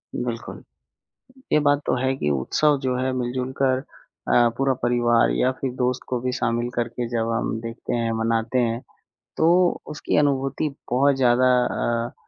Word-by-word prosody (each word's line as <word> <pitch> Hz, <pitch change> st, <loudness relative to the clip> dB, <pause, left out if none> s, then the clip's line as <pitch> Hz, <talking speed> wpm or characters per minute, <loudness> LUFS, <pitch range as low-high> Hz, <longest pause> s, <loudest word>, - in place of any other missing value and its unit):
बिल्कुल। -, -, -5 dB, 0.9 s
ये -, -, +5 dB
बात 145 Hz, -1 st, +3 dB
तो -, -, +1 dB
है 130 Hz, 0 st, +1 dB
कि 75 Hz, -, -1 dB
उत्सव 140 Hz, -, +2 dB
जो 130 Hz, -2 st, -1 dB
है 130 Hz, +1 st, 0 dB
मिलजुल 125 Hz, +1 st, -2 dB
कर 130 Hz, -1 st, +2 dB, 0.4 s
अ, 120 Hz, -1 st, +4 dB
पूरा 135 Hz, 0 st, +2 dB
परिवार 120 Hz, -, +3 dB
या 95 Hz, -, +2 dB
फिर 130 Hz, -2 st, -1 dB
दोस्त 125 Hz, 0 st, -1 dB
को 125 Hz, -, -1 dB
भी 125 Hz, -, -1 dB
शामिल 120 Hz, -1 st, -1 dB
करके 120 Hz, 0 st, -2 dB
जब 115 Hz, -1 st, -1 dB
हम 115 Hz, -1 st, -1 dB
देखते 115 Hz, 0 st, -5 dB
हैं 115 Hz, -1 st, 0 dB
मनाते 115 Hz, +2 st, 0 dB
हैं, 115 Hz, 0 st, 0 dB, 0.6 s
तो 175 Hz, +2 st, +3 dB
उसकी 150 Hz, -, -2 dB
अनुभूति 140 Hz, 0 st, +1 dB, 0.2 s
बहुत 140 Hz, +3 st, +3 dB
ज़्यादा 130 Hz, -1 st, +3 dB, 0.2 s
अ, 115 Hz, 0 st, -2 dB
125 Hz, 160 wpm, -23 LUFS, 120-135 Hz, 0.9 s, ये